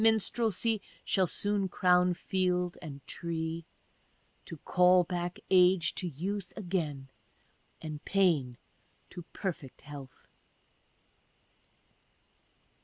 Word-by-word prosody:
istrelsy 225 0 +2 0.2
Shall 190 -2 +2
soon 205 +2 +1
crown 180 -1 +3
field 180 -1 0
and 140 -4 -9
tree, 165 -1 -4 0.8
To 165 - -8
call 180 +3 +4
back 175 0 -3
age 180 -2 +5
to 180 - -3
youth 185 +5 -4
again, 155 -9 -3 0.7
and 155 -2 -6
pain 160 -11 +2 0.5
to 175 - -7
perfect 160 -9 -5
health. 140 -3 -11
180 Hz, 90 wpm, -31 LUFS, 160-190 Hz, 0.8 s, age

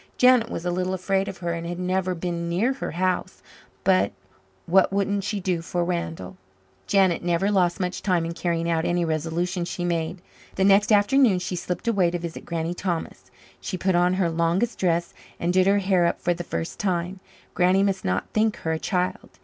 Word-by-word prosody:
Janet 250 -2 +5
was 170 - -5
a 175 - 0
little 185 +1 -1
afraid 195 +1 0
of 190 - -6
her, 170 - 0
and 170 0 -4
had 175 0 -4
never 185 0 -1
been 170 0 -3
near 210 +10 +1
her 270 - -5
house, 185 +2 -2 0.4
but 95 +2 +3 0.5
what 190 +3 +4
wouldn't 200 0 0
she 205 +1 -2
do 180 -3 -1
for 175 +1 -2
Randall? 165 - -4 0.5
Janet 190 -4 +3
never 175 +3 +1
lost 180 -2 +2
much 180 -1 -2
time 180 -4 +1
in 165 - -4
carrying 170 -1 -1
out 165 -1 +1
any 175 0 +1
resolution 165 +3 -1
she 175 +1 -4
made. 170 +1 -2 0.4
The 190 - +1
next 200 +2 +4
afternoon 215 +1 +4
she 180 0 -3
slipped 180 +4 -4
away 195 -6 +3
to 175 - -2
visit 170 -1 -7
Granny 165 0 -2
Thomas. 175 -2 -4 0.3
She 185 - -4
put 185 +1 +1
on 175 +1 +3
her 180 -3 +1
longest 170 +8 0
dress 170 -2 0 0.3
and 175 +1 0
did 185 0 +4
her 200 +1 +4
hair 190 -3 +2
up - - -2
for 175 - +1
the 175 0 -6
first 165 0 -5
time. 185 -1 -1 0.3
Granny 185 +2 +3
must 195 -1 0
not 90 +1 -1
think 215 0 +2
her 160 - -3
a 160 - -1
child. 180 0 -2
180 Hz, 200 wpm, -24 LUFS, 170-195 Hz, 0.5 s, Janet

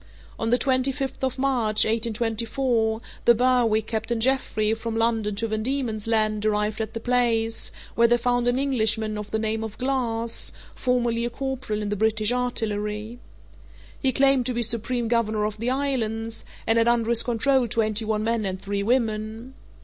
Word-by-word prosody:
On 225 - -1
the 245 - +4
twenty 260 0 +1
fifth 270 -1 -5
of 260 0 -1
March, 245 -6 +2
1824, 225 +1 0 0.2
the 235 - +7
Berwick, 240 -3 +2
Captain 225 +1 -2
Jeffrey, 225 -3 +1
from 225 0 -4
London 225 -2 +1
to 225 +3 -2
Van 215 0 -2
Diemen's 230 -4 -2
Land, 215 -2 +1
arrived 210 0 0
at 220 0 -5
the - - -2
place, 230 -2 +1 0.2
where 235 0 +4
they 240 +1 +4
found 245 0 0
an 245 +1 +2
Englishman 220 -5 +1
of 210 0 -6
the 220 - -1
name 220 0 -1
of 220 -1 -7
Glass, 235 -3 -1 0.2
formerly 240 -2 0
a 240 - -1
corporal 260 -4 -3
in 205 - -3
the 210 - -1
British 220 +1 +1
artillery. 220 -2 -2 0.8
He 265 - +1
claimed 270 -1 +3
to 250 - -2
be 240 - +1
supreme 235 +1 +1
governor 220 -2 +1
of 210 0 -4
the 235 +2 -1
islands, 230 -5 -2 0.2
and 225 +1 +3
had 230 - +2
under 235 -1 +2
his 235 -1 +4
control 255 +1 +1
twenty 215 0 +1
one 215 -1 -1
men 230 0 0
and 190 -1 -3
three 200 +1 -3
women. 225 +1 -1
230 Hz, 175 wpm, -24 LUFS, 215-245 Hz, 0.8 s, the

